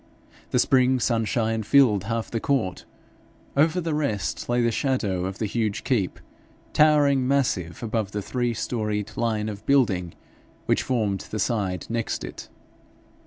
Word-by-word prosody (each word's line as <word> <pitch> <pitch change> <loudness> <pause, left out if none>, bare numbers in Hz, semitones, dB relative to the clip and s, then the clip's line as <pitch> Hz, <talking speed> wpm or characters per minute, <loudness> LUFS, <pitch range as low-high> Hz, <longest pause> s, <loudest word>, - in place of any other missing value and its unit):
The - - +1
spring 130 0 +3
sunshine 115 -1 0
filled 110 -3 +4
half 115 +1 -3
the 115 - -1
court; 110 -9 -1 0.7
over 155 +5 +3
the 165 -2 -2
rest 130 - -2
lay 120 0 +2
the 115 -1 +2
shadow 110 -9 0
of 95 0 -4
the 110 - -2
huge 105 -1 -1
keep, 110 -9 0 0.5
towering 145 -4 +4
massive 120 - 0
above 110 -3 -1
the 105 -1 -3
three 120 +1 -1
storied 105 -3 -2
line 110 -2 -1
of 105 -1 -6
building 100 -11 +2 0.5
which - - +2
formed 105 -6 -1
the 110 - -4
side 95 -4 -1
next 115 -1 -2
it. - - -8
115 Hz, 145 wpm, -25 LUFS, 105-130 Hz, 0.7 s, filled